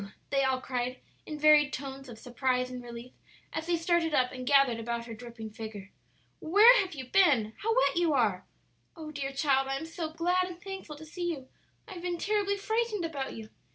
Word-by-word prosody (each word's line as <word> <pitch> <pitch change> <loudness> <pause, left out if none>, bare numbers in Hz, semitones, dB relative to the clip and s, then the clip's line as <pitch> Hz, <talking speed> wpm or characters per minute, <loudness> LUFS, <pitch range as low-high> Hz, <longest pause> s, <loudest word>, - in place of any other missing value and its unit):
they 275 -1 +2
all 265 -1 +1
cried 255 0 -3 0.3
in 305 - -5
varied 300 -1 +5
tones 270 -1 -6
of 230 - -9
surprise 250 +1 -1
and 250 -1 -6
relief, 240 +1 -9 0.4
as 320 0 -4
they 345 -1 +2
started 330 -2 +1
up 250 -1 +2
and 255 -1 -7
gathered 275 -4 +4
about 235 +1 -3
her 230 - -7
dripping 225 -1 -9
figure. 215 -3 -8 0.5
"Where 420 +9 +7
have 375 -4 -5
you 260 -2 -6
been?" 255 - +3
"How 450 +2 +1
wet - - +3
you 345 -2 +3
are!" 210 -9 +1 0.5
"Oh, 310 -2 -8
dear 275 -2 -4
child, 270 -1 +1
I 270 0 -1
am 320 - -6
so 325 0 -5
glad 355 +3 +1
and 350 -1 -9
thankful 385 -5 -7
to 310 +2 -11
see 345 +3 -4
you; 270 -6 -5 0.4
I 410 - -8
have 350 - -8
been 350 -1 -2
terribly 405 +1 0
frightened 440 -2 -1
about 280 -5 -4
you!" 220 -1 -9
280 Hz, 205 wpm, -29 LUFS, 250-345 Hz, 0.5 s, Where